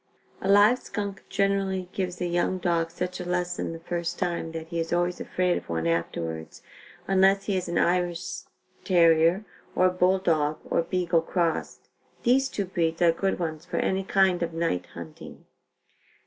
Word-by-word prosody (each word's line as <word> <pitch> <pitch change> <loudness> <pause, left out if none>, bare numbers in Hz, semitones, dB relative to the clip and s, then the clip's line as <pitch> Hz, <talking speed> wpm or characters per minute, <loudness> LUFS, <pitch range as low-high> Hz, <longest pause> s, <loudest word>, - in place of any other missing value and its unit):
A 190 - -2
live 205 +5 +6
skunk 200 -2 -5
generally 195 -2 0
gives 180 -2 -3
a 180 - -1
young 175 +2 0
dog 170 -2 0
such 180 +2 -4
a - - -3
lesson 180 0 -2
the 165 - -6
first 170 0 -3
time 170 -2 -2
that 160 0 -7
he 170 -1 -3
is 165 0 -3
always 175 +1 0
afraid 180 -1 0
of - - -20
one 80 0 -2
afterwards, 85 -1 -3 0.4
unless 195 +1 +4
he 200 - 0
is 180 -2 -2
an 170 - -1
Irish 175 -1 0 0.4
terrier 170 +2 +4 0.3
or 185 0 +4
bull 180 +1 +3
dog 155 -5 +1
or - - +2
beagle 170 -1 +1
crossed. 165 -1 -2 0.4
These 265 +2 +3
two 200 - -2
breeds 170 -2 -1
are 170 - +6
good 190 +4 -1
ones 160 -3 -4
for - - -5
any 190 0 0
kind 190 -2 +2
of 165 -1 -2
night 165 - -1
hunting. 85 -2 -10
175 Hz, 170 wpm, -26 LUFS, 165-190 Hz, 0.4 s, live